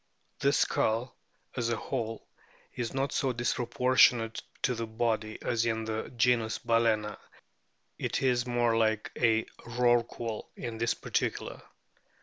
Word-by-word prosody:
The 140 - +3
skull, 120 -2 +1 0.4
as 120 -2 0
a 115 - +1
whole, 115 -2 -4 0.5
is 120 -2 -3
not 135 +1 -1
so 130 -2 0
dispro 120 0 -1
portionate 125 -3 +4 0.2
to 125 - +2
the 115 -1 -4
body 110 -1 -1
as 115 -1 +1
in 110 -1 -1
the 110 0 -3
genus 115 -2 +2
Bal&na; 115 -3 +1 0.8
it - - -1
is 125 -2 +2
more 120 -1 +2
like 110 -1 +1
a 115 -2 +3 0.2
Rorqual 120 -2 0
in 115 -2 -6
this 115 0 +1
particular. - - -2
115 Hz, 135 wpm, -30 LUFS, 110-120 Hz, 0.8 s, portionate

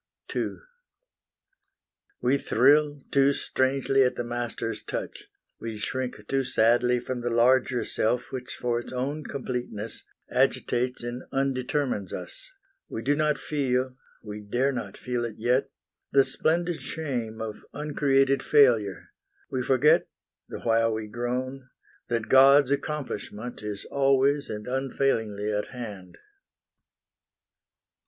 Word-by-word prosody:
II - - -1 1.7
We 130 +3 +2
thrill 145 +4 +3
too 140 0 +4
strangely 135 0 +1
at 125 - +1
the - - -2
master's 120 0 -3
touch; - - -5 0.3
We 115 -1 -5
shrink 125 -1 -4
too 135 0 +1
sadly 125 0 +3
from 125 0 -4
the 120 - -1
larger 125 +1 +3
self 120 +3 0
Which 130 -1 -5
for 120 -1 -1
its 120 - -7
own 140 +4 -2
completeness 125 -5 -4 0.3
agitates 125 0 +1
And 120 +1 -4
undetermines 130 -5 -1
us; - - -8 0.4
we 110 - -5
do 145 - +3
not 150 -1 +2
feel 130 -3 -1 0.3
We 105 -1 -6
dare 120 +7 0
not 130 - -5
feel 125 -1 -2
it 115 -2 -4
yet 125 +4 +1 0.4
the 135 -1 +5
splendid 170 +1 +1
shame 120 -8 -4
Of 110 -1 -6
uncreated 140 -2 +2
failure; 115 -10 +3 0.4
we 130 - -1
forget, 130 +3 +4 0.4
The - - -7
while 115 0 +3
we 110 0 -3
groan, 125 +3 -3 0.4
that 115 -2 -1
God's 135 +1 +7
accomplishment 125 -6 -4
Is 105 -1 -5
always 140 +1 +2
and 105 0 -5
unfailingly 125 -5 -1
at 105 0 -1
hand. 105 -7 -8
125 Hz, 120 wpm, -27 LUFS, 115-135 Hz, 1.7 s, God's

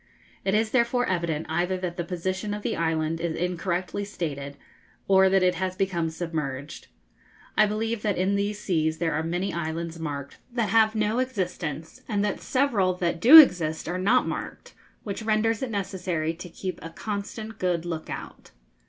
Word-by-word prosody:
It 195 +1 +1
is 220 0 +1
therefore 245 0 +2
evident 170 -4 -1
either 175 +3 0
that 180 -2 -4
the 175 - -2
position 190 +4 -3
of 210 - -7
the - - -1
island 160 0 -1
is 165 -1 -1
incorrectly 180 +2 -2
stated, 145 -8 -5 0.5
or 190 0 +6
that 190 -1 +3
it 180 0 +4
has 185 +1 -2
become 175 -4 0
submerged. 155 -4 -5 0.7
I 215 - +5
believe 220 +1 -2
that 210 -3 0
in 185 +2 +1
these 200 +1 0
seas 160 -6 0
there 165 -1 0
are 155 - 0
many 175 +4 -2
islands 165 0 -4
marked 140 -3 -5
that 235 -4 0
have 220 -1 +4
no 215 +2 +1
existence, 180 - -3
and 205 -2 +1
that 205 - -2
several 230 -9 +2
that 170 -2 -1
do 275 - +11
exist 170 - +6
are 180 +2 -2
not 230 +7 +3
marked, - - -6 0.3
which 200 +1 -4
renders 220 0 +1
it 260 - -2
necessary 180 -6 -2
to 175 +2 -9
keep 185 0 -5
a 165 - -7
constant 215 +4 -5
good 175 -2 0
look 165 -2 -4
out. - - -8
185 Hz, 175 wpm, -26 LUFS, 165-210 Hz, 0.7 s, do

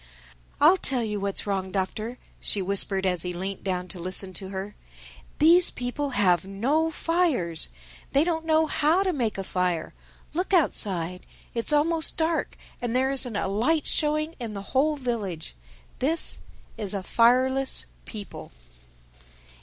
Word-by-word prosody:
"I'll 330 +6 +6
tell 260 -8 0
you 210 -2 -2
what's 200 0 -2
wrong, 190 -2 -2
Doctor," 215 +5 -3 0.2
she 205 - 0
whispered 195 0 +2
as 180 -2 +1
he 180 0 -2
leant 190 +2 -5
down 185 -2 -2
to 180 - -5
listen 185 +2 -3
to 190 +2 -5
her: 195 +2 -5 0.6
"these 340 +4 +7
people 250 +4 -3
have 180 -5 +4
no 260 +12 0
fires! 310 - 0 0.4
They 280 - +4
don't 325 -1 -1
know 320 0 +3
how 315 +4 +2
to 375 -2 0
make 235 -9 -1
a 195 - -3
fire. 180 -3 -1 0.4
Look 365 +4 0
outside: 180 - 0 0.3
It's 230 +3 +2
almost 315 +2 +1
dark, 325 0 -1 0.2
and 240 -1 -2
there 265 +1 +2
isn't 255 -4 -1
a 200 - -1
light 245 +11 +1
showing 305 +1 +1
in 225 -4 -5
the 200 - -5
whole 295 +3 +3
village. 220 - -4 0.5
This 320 +6 +1 0.4
is 205 -2 -1
a 195 - -3
fireless 255 +5 +3 0.2
people." 210 -3 -8
235 Hz, 150 wpm, -26 LUFS, 190-305 Hz, 0.6 s, these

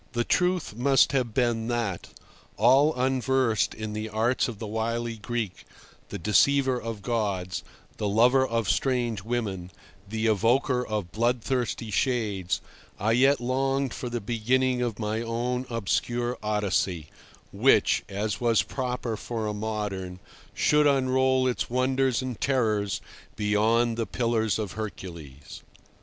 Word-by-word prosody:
The 120 -1 +1
truth 180 - 0
must 135 +3 +4
have 130 -4 0
been 115 -2 0
that, 115 -7 -2 0.5
all 135 +8 +5
unversed 130 -3 +1
in 110 -1 -5
the 110 +1 -4
arts 115 +4 +1
of 120 -4 -6
the 110 - -6
wily 115 +2 -2
Greek, 110 -3 -4 0.5
the - - -5
deceiver 130 +6 +3
of 115 -3 -6
gods, 100 -6 -2 0.3
the 105 - -1
lover 125 +6 +4
of 115 -4 -1
strange 120 -5 0
women, 100 -5 -3 0.4
the 110 +1 -2
evoker 125 +4 +2
of 105 -5 -3
bloodthirsty 120 +1 -1
shades, 100 -6 0 0.4
I 110 +3 +1
yet 135 +4 +4
longed 135 +1 0
for 125 - -5
the 120 0 -2
beginning 125 +4 0
of 120 -4 -2
my 110 0 -2
own 120 +2 -2
obscure 120 +2 -1
Odyssey, 100 -6 -1 0.4
which, - - +3
as 105 +2 -3
was 115 -2 +3
proper 125 -3 -3
for 110 0 -4
a 105 - -2
modern, 105 -4 -4 0.4
should 150 0 +4
unroll 130 -1 +2
its 125 - -1
wonders 130 0 +1
and 125 -3 -5
terrors 110 -7 0 0.3
beyond 110 +3 +2
the 115 - -1
Pillars 115 -3 0
of 105 -4 -3
Hercules. 85 -10 -8
115 Hz, 135 wpm, -26 LUFS, 105-125 Hz, 0.5 s, all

